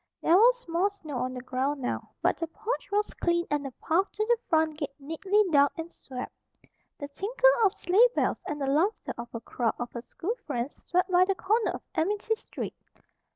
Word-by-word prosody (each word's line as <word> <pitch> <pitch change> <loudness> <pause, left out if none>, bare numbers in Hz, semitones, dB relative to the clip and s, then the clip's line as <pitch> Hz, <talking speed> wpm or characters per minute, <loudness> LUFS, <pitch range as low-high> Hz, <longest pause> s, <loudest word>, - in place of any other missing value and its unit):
There 335 - +4
was 485 +3 +5
more 345 +4 +2
snow 315 -9 -7
on 255 +1 -2
the 250 - -6
ground 265 +3 -1
now; 250 - -3
but - - +3
the 330 - -2
porch 440 +10 -4
was 415 +1 0
cleaned 345 0 +1
and 295 -1 +1
the 275 - -5
path 350 +9 0
to 430 - -1
the 475 +1 +3
front 315 -1 +2
gate 280 -3 -4
neatly 325 +9 +1
dug 285 -1 +6
and 330 +1 -5
swept. 250 -2 -7 0.6
The 285 - -5
tinkle 445 +12 +3
of 400 - +5
sleigh 420 +8 +4
bells - - +1
and 295 - -3
the 275 - -1
laughter 320 +11 +1
of 235 0 -7
a 230 - -4
crowd 235 0 -1
of 240 0 -5
her 235 - -6
school 350 - -4
friends 250 -1 -4
swept 365 +1 +2
by 360 0 +6
the 390 0 0
corner 435 +5 +1
of - - -5
Amity 410 +6 0
Street. 445 - -6
330 Hz, 205 wpm, -28 LUFS, 280-405 Hz, 0.6 s, dug